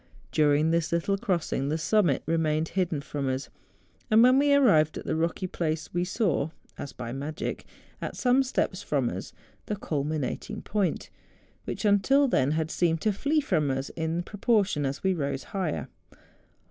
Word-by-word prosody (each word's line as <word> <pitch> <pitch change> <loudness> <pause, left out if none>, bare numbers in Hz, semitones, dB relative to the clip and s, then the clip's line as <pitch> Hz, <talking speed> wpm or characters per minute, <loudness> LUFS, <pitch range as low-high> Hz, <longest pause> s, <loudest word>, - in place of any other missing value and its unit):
During 150 +1 +3
this 165 -1 0
little 170 +4 +1
crossing 175 - -1
the 155 - 0
summit 170 -4 +2
remained 160 -1 0
hidden 175 -6 -1
from 140 -1 -3
us; 130 +2 -3 0.6
and 220 +1 +6
when 255 +2 +6
we 285 0 +3
arrived 185 - +4
at - - -7
the - - -1
rocky 165 +3 -1
place 160 -3 -3
we 175 0 +1
saw, 180 - 0 0.3
as 140 - -7
by 120 -2 -6
magic, 145 +3 -4 0.4
at - - -4
some 255 +1 +3
steps 265 -1 -1
from - - 0
us, - - -6 0.4
tlie 210 -2 -3
culminating 155 +6 -3
point, 205 -3 -1 0.5
which, - - -4
until 240 +8 +4
then, 145 - +2
liad 160 0 -1
seemed 165 -2 +1
to 215 - +1
flee 290 +9 +1
from 155 - +1
us 135 +1 -2
in 165 +1 -2
proportion 200 - +1
as 135 +2 -5
we 190 0 +3
rose 140 -5 -2
higher. 175 - -2
165 Hz, 165 wpm, -27 LUFS, 150-205 Hz, 0.6 s, and